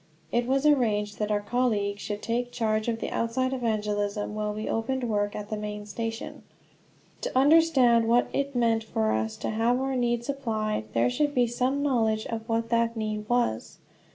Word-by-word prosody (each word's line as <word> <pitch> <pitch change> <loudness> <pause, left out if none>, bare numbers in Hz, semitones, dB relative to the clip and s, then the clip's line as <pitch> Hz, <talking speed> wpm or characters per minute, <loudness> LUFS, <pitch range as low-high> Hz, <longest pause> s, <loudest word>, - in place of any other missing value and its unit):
It 240 0 +1
was 270 +2 +1
arranged 215 -8 +2
that 210 0 -1
our 205 -1 +1
colleague 205 -3 0
should 205 0 -5
take 245 +1 -1
charge 220 -2 0
of 230 -1 0
the - - -4
outside 255 +3 0
evangelism, 210 -4 -1
while 210 0 -2
we 215 +1 -5
opened 255 +3 -1
work 205 -3 0
at 210 0 -6
the - - 0
main 210 0 -5
station. 225 +2 -5 0.8
To - - -2
understand 270 -6 +5
what 240 +1 +3
it 280 -1 -1
meant 230 -2 +2
for 110 - 0
us 110 0 -1
to - - -3
have 230 +3 +1
our 265 0 -1
need 240 -1 0
supplied, 220 - -2
there 120 +1 +2
should 290 -1 0
be 245 -1 +4
some 255 +4 0
knowledge 225 -6 +1
of 225 0 -5
what 230 0 0
that 230 0 +1
need 215 -1 -3
was. 240 - 0
230 Hz, 180 wpm, -27 LUFS, 210-245 Hz, 0.8 s, understand